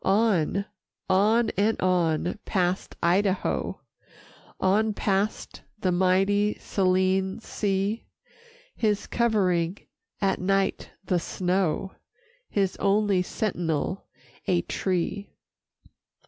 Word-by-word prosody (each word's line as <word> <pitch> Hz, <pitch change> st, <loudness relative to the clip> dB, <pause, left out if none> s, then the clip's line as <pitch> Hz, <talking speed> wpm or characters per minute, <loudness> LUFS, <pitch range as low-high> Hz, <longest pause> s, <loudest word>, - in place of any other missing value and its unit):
On, 195 Hz, -2 st, +2 dB, 0.5 s
on 215 Hz, +5 st, +3 dB
and 210 Hz, +3 st, +1 dB
on, 180 Hz, 0 st, +1 dB
past 180 Hz, -1 st, -1 dB
Idaho, 185 Hz, +2 st, +1 dB, 0.8 s
On 210 Hz, +3 st, +2 dB
past 200 Hz, +1 st, -1 dB, 0.2 s
the 185 Hz, -3 st, 0 dB
mighty 195 Hz, +3 st, +2 dB
Saline 190 Hz, 0 st, +1 dB
sea, 205 Hz, 0 st, -2 dB, 0.7 s
His 210 Hz, -3 st, 0 dB
covering 190 Hz, -6 st, +1 dB, 0.4 s
at 195 Hz, -2 st, 0 dB
night 195 Hz, +1 st, 0 dB, 0.2 s
the 180 Hz, -1 st, +1 dB
snow, 185 Hz, +1 st, -1 dB, 0.6 s
His 195 Hz, -2 st, 0 dB
only 200 Hz, -1 st, +2 dB
sentinel 180 Hz, -2 st, -2 dB, 0.4 s
a 175 Hz, -2 st, +2 dB
tree. 190 Hz, +2 st, -2 dB
190 Hz, 85 wpm, -26 LUFS, 185-205 Hz, 0.8 s, on